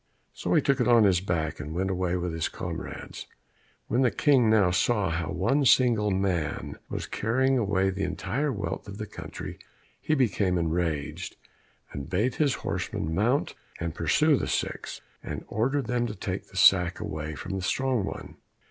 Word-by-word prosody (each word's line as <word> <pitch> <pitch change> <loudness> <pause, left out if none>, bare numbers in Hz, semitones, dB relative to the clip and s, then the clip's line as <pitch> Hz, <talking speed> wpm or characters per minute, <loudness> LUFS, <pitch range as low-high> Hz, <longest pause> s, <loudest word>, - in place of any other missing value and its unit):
So - - -1
he - - +4
took 140 -2 +2
it 125 - +2
on 120 -2 +6
his 95 -3 +4
back, 85 -5 -2
and 75 +2 -6
went 95 +2 0
away 90 -1 0
with 90 -1 -3
his 80 -1 -1
comrades. - - -6 0.6
When 125 - +1
the 130 - +4
King 125 0 +3
now 105 -5 +4
saw 95 +1 +1
how 80 -1 -2
one 140 +4 +1
single 120 -5 +4
man 90 -7 -1
was - - -3
carrying 130 +4 +1
away 95 -3 +1
the 95 +1 -5
entire 100 +10 -1
wealth 100 -1 -4
of 100 0 -8
the 110 - -4
country, - - -8 0.4
he 155 - +1
became 100 -8 +1
enraged, 80 -3 -2 0.6
and 70 +2 -6
bade 105 +8 +1
his 145 -4 +2
horsemen 80 - -2
mount 115 - +1 0.3
and 85 -1 -3
pursue 140 - +3
the - - -2
six, - - -3 0.2
and - - -6
ordered 135 +5 0
them 120 0 0
to 105 - -5
take 95 0 -4
the 95 - -11
sack 90 -2 +5
away 75 0 -4
from 70 - -6
the 95 - -3
strong 130 +4 0
one. - - -7
100 Hz, 175 wpm, -27 LUFS, 90-120 Hz, 0.6 s, on